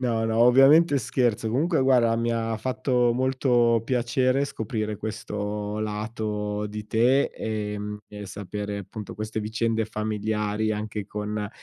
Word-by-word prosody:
No, 115 Hz, -3 st, 0 dB
no, 110 Hz, 0 st, 0 dB
ovviamente 140 Hz, +5 st, +6 dB
scherzo. 115 Hz, -2 st, 0 dB
Comunque 155 Hz, -, +1 dB
guarda, 125 Hz, -3 st, +4 dB
mi 115 Hz, +1 st, 0 dB
ha 115 Hz, -1 st, -1 dB
fatto 125 Hz, +1 st, +1 dB
molto 125 Hz, -2 st, +2 dB
piacere 130 Hz, +2 st, +1 dB
scoprire 110 Hz, -4 st, -3 dB
questo 105 Hz, -1 st, -4 dB
lato 105 Hz, -1 st, -3 dB
di 105 Hz, 0 st, -7 dB
te, 120 Hz, +6 st, +3 dB
ehm, 105 Hz, -1 st, -4 dB
e 105 Hz, -1 st, -9 dB
sapere 105 Hz, +1 st, -5 dB
appunto 100 Hz, +1 st, -8 dB
queste 110 Hz, +1 st, -4 dB
vicende 110 Hz, +1 st, -1 dB
familiari 110 Hz, 0 st, -1 dB
anche 105 Hz, -1 st, -4 dB
con 105 Hz, 0 st, -4 dB
110 Hz, 130 wpm, -25 LUFS, 105-120 Hz, -, ovviamente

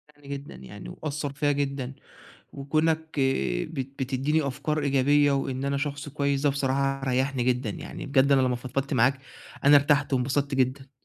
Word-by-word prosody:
يعني 145 Hz, -1 st, -18 dB
جدًا 140 Hz, -, -6 dB
يعني 65 Hz, -1 st, -10 dB
وأثّر 145 Hz, -, -4 dB
فيّا 145 Hz, +1 st, +1 dB
جدًا، 140 Hz, -2 st, -2 dB, 0.6 s
وكونك 155 Hz, +2 st, -1 dB
آآ 65 Hz, -, +1 dB
بت 135 Hz, -4 st, -5 dB
بتدّيني 140 Hz, +3 st, 0 dB
أفكار 150 Hz, +3 st, -2 dB
إيجابية 145 Hz, +1 st, +3 dB
وإن 135 Hz, -1 st, -1 dB
أنا 140 Hz, 0 st, 0 dB
شخص 145 Hz, 0 st, -3 dB
كويس 140 Hz, -1 st, 0 dB
ده 145 Hz, -, +3 dB
بصراحة 135 Hz, 0 st, 0 dB
ريحّني 130 Hz, 0 st, 0 dB
جدًا 125 Hz, +1 st, 0 dB
يعني، -, -, -7 dB
بجد 140 Hz, 0 st, +3 dB
أنا 135 Hz, -1 st, +5 dB
لمّا 125 Hz, -1 st, +1 dB
فضفضت 135 Hz, +3 st, -3 dB
معاك 130 Hz, +2 st, +3 dB, 0.5 s
أنا 145 Hz, +1 st, +8 dB
ارتحت 145 Hz, 0 st, +3 dB
وانبسطت 140 Hz, +2 st, 0 dB
جدًا. 130 Hz, +1 st, 0 dB
140 Hz, 165 wpm, -26 LUFS, 130-145 Hz, 0.6 s, أنا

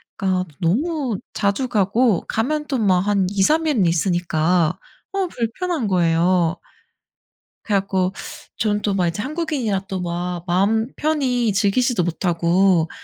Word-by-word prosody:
그러니까 185 Hz, -2 st, -1 dB
너무 255 Hz, -, 0 dB
자주 200 Hz, +6 st, 0 dB
가고 215 Hz, -1 st, +2 dB
가면 300 Hz, +7 st, -1 dB
또 270 Hz, -, -1 dB
막 195 Hz, -6 st, +3 dB
한 200 Hz, -3 st, +2 dB
2-3 300 Hz, +12 st, +2 dB
일은 245 Hz, -11 st, +2 dB
있으니까 175 Hz, 0 st, +1 dB, 0.3 s
어 390 Hz, -1 st, -1 dB
불편한 280 Hz, -, -2 dB
거예요. 175 Hz, -1 st, +2 dB, 1.1 s
그래 205 Hz, -3 st, +2 dB
갖고 190 Hz, -1 st, -1 dB, 0.4 s
저는 210 Hz, -1 st, 0 dB
또 205 Hz, -, 0 dB
막 185 Hz, -3 st, +1 dB
이제 170 Hz, +5 st, -3 dB
한국인이라 275 Hz, -, -2 dB
또 190 Hz, -1 st, -3 dB
막 175 Hz, 0 st, -3 dB
마음 200 Hz, +6 st, +2 dB
편히 255 Hz, -8 st, 0 dB
즐기지도 205 Hz, +1 st, +1 dB
못하고 175 Hz, 0 st, +2 dB
195 Hz, 260 characters per minute, -21 LUFS, 180-245 Hz, 1.1 s, 막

